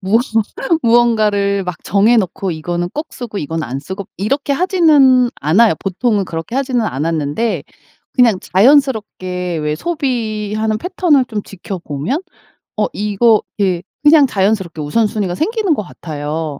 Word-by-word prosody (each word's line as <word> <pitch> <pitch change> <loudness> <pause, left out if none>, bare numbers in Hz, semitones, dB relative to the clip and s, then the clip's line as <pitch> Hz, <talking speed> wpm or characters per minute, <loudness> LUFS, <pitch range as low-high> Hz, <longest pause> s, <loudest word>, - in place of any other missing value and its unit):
무언 205 +4 +2 0.6
무언가를 215 -4 +2
막 180 -2 -6
정해 210 +4 +3
놓고 190 -2 -1
이거는 175 +2 -3
꼭 300 +2 -4
쓰고 235 -4 -6
이건 160 +2 -3
안 135 -1 -4
쓰고 190 +6 -7
이렇게 275 +9 -1
하지는 290 -8 +4
않아요. 190 +10 +4
보통은 200 +1 0
그렇게 165 +7 -5
하지는 260 -3 0
않았는데 160 - -1 0.5
그냥 235 -6 +4
자연스럽게 195 - +1
왜 150 -1 -1
소비하는 220 - -2
패턴을 335 - +2
좀 215 -4 -4
지켜보면 180 - -5 0.6
어 210 - +1
이거 210 +2 +2 0.2
이렇게 185 -4 0 0.2
그냥 295 -1 +6
자연스럽게 190 -7 -1
우선순위가 205 +3 0
생기는 415 - 0
것 210 - -3
같아요. 155 -3 -5
210 Hz, 320 characters per minute, -16 LUFS, 175-245 Hz, 0.6 s, 그냥